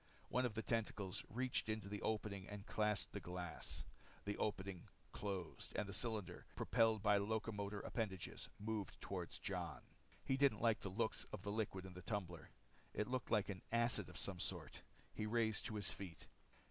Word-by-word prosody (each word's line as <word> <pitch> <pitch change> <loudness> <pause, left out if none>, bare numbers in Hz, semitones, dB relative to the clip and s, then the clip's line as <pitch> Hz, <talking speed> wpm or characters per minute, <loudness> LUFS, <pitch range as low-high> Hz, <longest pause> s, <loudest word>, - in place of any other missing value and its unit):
One 125 0 +4
of 110 - -7
the 110 - 0
tentacles 105 -3 0
reached 125 -1 +1
into 110 -2 0
the 105 0 -3
opening 105 -3 0
and 105 -1 -5
clasped 105 -1 +2
the 100 - -1
glass. 90 -1 -2 0.4
The 100 0 0
opening 95 -3 -1 0.2
closed 95 -5 -3
and 105 - +1
the 100 - -4
cylinder, 110 -2 -1
propelled 115 -3 +4
by 105 -1 +7
locomotor 105 -1 0
appendages, 100 -6 -2
moved 105 -3 -2
toward - - -2
Jon. - - -2 0.4
He 135 - +3
didn't 135 -6 +5
like 115 -2 +5
the 100 - -3
looks 110 +4 +1
of 100 -3 -6
the 100 - -1
liquid 100 -3 0
in 95 - -7
the 90 - -7
tumbler. 90 -4 -2 0.5
It 105 - +1
looked 130 -1 0
like 105 -3 +4
an 95 -2 -3
acid 120 +1 +3
of - - -4
some - - +1
sort. - - -2 0.3
He 105 - -1
raised 110 -1 +3
to 110 - -2
his 100 -4 +1
feet. 85 -6 -6
105 Hz, 175 wpm, -43 LUFS, 95-110 Hz, 0.5 s, by